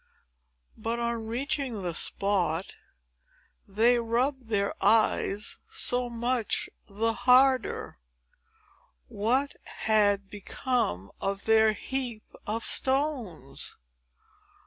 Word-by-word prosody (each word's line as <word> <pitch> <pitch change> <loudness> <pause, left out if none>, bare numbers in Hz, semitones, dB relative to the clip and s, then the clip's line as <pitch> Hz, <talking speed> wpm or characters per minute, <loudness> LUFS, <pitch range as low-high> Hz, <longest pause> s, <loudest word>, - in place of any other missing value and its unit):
But, 225 +2 -3
on 235 -1 -2
reaching 250 -2 -2
the 175 -2 -2
spot, 185 -2 0 0.9
they 230 +5 +3
rubbed 245 +3 -1
their 200 -3 0
eyes 210 -2 +2
so 245 0 0
much 235 0 0 0.2
the 225 +3 -1
harder. 250 - +3 1.1
What 255 +7 0 0.3
had 205 -2 +3
become 205 - -2
of 195 0 -2
their 220 -1 +5
heap 245 -2 -4 0.2
of 220 +2 -2
stones! 260 - -1
225 Hz, 85 wpm, -28 LUFS, 205-250 Hz, 1.1 s, their